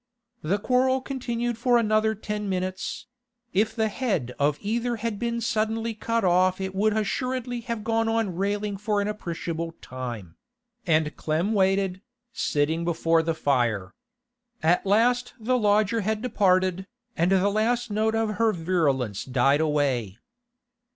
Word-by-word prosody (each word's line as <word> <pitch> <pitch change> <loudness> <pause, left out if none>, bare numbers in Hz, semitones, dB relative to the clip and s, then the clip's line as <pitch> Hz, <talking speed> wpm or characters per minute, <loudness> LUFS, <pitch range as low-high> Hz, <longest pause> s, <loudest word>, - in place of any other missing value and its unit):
The 180 +7 0
quarrel 260 +4 +2
continued 240 -3 -3
for 245 0 +4
another 220 -1 +2
ten 210 -1 -4
minutes—if 235 +4 -3
the 220 -2 +1
head 200 - -2
of 145 +1 +2
either 235 +3 -1
had 220 -2 -3
been 235 0 -2
suddenly 225 0 -1
cut 230 +1 -1
off 185 +1 +3
it 190 0 -3
would 210 +2 +1
assuredly 245 +2 -2
have 230 -3 -3
gone 225 0 +1
on 225 -5 0
railing 200 +2 -1
for 210 +1 0
an 200 - 0
appreciable 170 -4 -4
time—and 155 - -4
Clem 165 +7 0
waited, 190 -1 +1 0.3
sitting 155 +3 0
before 165 -1 +2
the 165 0 -1
fire. 115 -10 0 0.7
At 175 +4 +2
last 245 +5 +2
the 245 +3 +1
lodger 215 0 +2
had 215 +2 -2
departed, 185 -5 +2 0.3
and 170 +3 +2
the 195 +1 +3
last 225 +3 0
note 220 +1 +1
of 220 -2 -1
her 225 -1 +3
virulence 145 - 0
died 135 +3 +2
away. 135 -10 0
205 Hz, 135 wpm, -25 LUFS, 170-230 Hz, 0.7 s, for